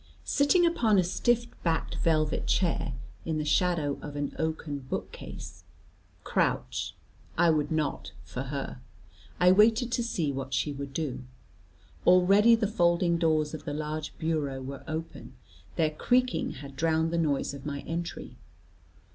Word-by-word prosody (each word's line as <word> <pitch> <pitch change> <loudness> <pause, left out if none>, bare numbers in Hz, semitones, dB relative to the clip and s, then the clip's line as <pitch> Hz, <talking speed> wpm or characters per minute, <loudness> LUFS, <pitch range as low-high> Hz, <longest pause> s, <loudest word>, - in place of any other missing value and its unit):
Sitting 295 +5 +4
upon 235 -11 +3
a 185 - +5
stiff 240 +6 +1 0.2
backed 165 -2 0
velvet 155 -2 +1
chair, 165 -6 0 0.3
in 160 -1 -2
the 150 - -2
shadow 155 -2 +1
of 145 -1 -7
an 145 -1 -3
oaken 160 -2 -2
bookcase 90 -8 -7 0.6
crouch - - -1 0.4
I 170 0 +5
would 150 -1 0
not 155 -2 -1
for 125 - -6
her 135 -2 -5 0.6
I 180 0 +6
waited 225 +5 +4
to 240 -1 0
see 170 -10 -1
what 135 -1 -3
she 145 +3 0
would 140 0 -6
do. 135 -4 -3 0.8
Already 195 +6 +6
the 225 -1 0
folding 175 -3 +2
doors 155 -2 +2
of 155 - -7
the 145 - -3
large 150 0 -4
bureau 150 -4 -1
were 135 +1 -7
open; 160 +1 -6 0.4
their 155 -2 +2
creaking 250 +10 +1
had 140 0 -10
drowned 160 +1 +1
the 170 - +1
noise 145 -4 0
of 140 +1 -7
my 140 -1 -3
entry. 170 +1 -5
160 Hz, 145 wpm, -28 LUFS, 145-180 Hz, 0.8 s, I